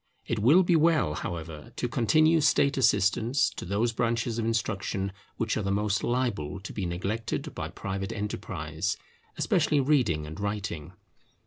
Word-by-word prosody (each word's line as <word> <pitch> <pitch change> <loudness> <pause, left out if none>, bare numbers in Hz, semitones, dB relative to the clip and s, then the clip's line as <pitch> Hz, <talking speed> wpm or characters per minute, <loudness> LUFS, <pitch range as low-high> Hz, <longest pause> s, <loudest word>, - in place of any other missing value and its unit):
It 115 - -1
will 145 - +6
be 175 -1 +3
well, 155 - +3
however, 80 -2 -6
to 125 - -1
continue 155 +7 +3
State 140 -1 +3
assistance 115 +1 +3
to - - -7
those 105 +6 0
branches 115 0 0
of 115 - -1
instruction 100 -3 -1 0.3
which 115 -1 0
are - - 0
the 100 - -2
most 105 0 0
liable 115 -9 -1
to 105 - -8
be 95 -4 -2
neglected 100 +6 -3
by - - -4
private 95 +1 -4
enterprise, 85 -7 -3 0.4
especially 150 - +2
reading 130 - +2
and 80 +4 -8
writing. 95 -6 -4
105 Hz, 150 wpm, -28 LUFS, 95-120 Hz, 0.4 s, will